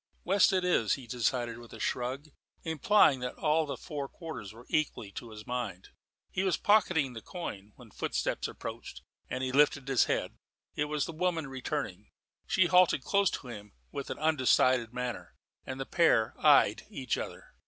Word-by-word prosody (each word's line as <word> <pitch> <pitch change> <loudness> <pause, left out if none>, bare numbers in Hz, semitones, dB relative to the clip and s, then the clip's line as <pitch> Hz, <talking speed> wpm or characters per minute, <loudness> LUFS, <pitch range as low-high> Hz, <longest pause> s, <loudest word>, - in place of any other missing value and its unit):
"West 195 +1 +4
it 185 -1 +1
is," 115 -12 +2
he 135 - -10
decided 120 0 -1
with 120 -1 -13
a 115 - -9
shrug, 130 +7 -2 0.3
implying 160 -2 +4
that 125 0 -4
all 155 0 +1
the 140 - -4
four 145 -5 -5
quarters 160 - -8
were 115 +3 -14
equally 150 -9 -1
to 120 +3 -8
his 105 -1 -10
mind. 120 -7 -4 0.4
He 185 - -1
was 190 -2 +1
pocketing 175 -10 +3
the 115 - -7
coin, 105 - -7
when - - -15
footsteps - - -2
approached, - - -8 0.3
and 130 0 -3
he 130 - -1
lifted 140 0 +3
his 135 -3 +4
head. - - -2 0.3
It 150 - 0
was 150 -1 -1
the - - -5
woman 165 -1 -1
returning. 135 -1 -4 0.4
She 185 - +3
halted 180 -6 +4
close 200 +3 +3
to 125 - -6
him 105 -3 -9 0.2
with 140 - -5
an - - -4
undecided 130 -5 +3
manner, 125 -1 -5 0.3
and 130 0 -5
the 135 - -3
pair 120 -11 +3
eyed - - +5
each - - -2
other. - - -7
135 Hz, 175 wpm, -30 LUFS, 120-160 Hz, 0.4 s, eyed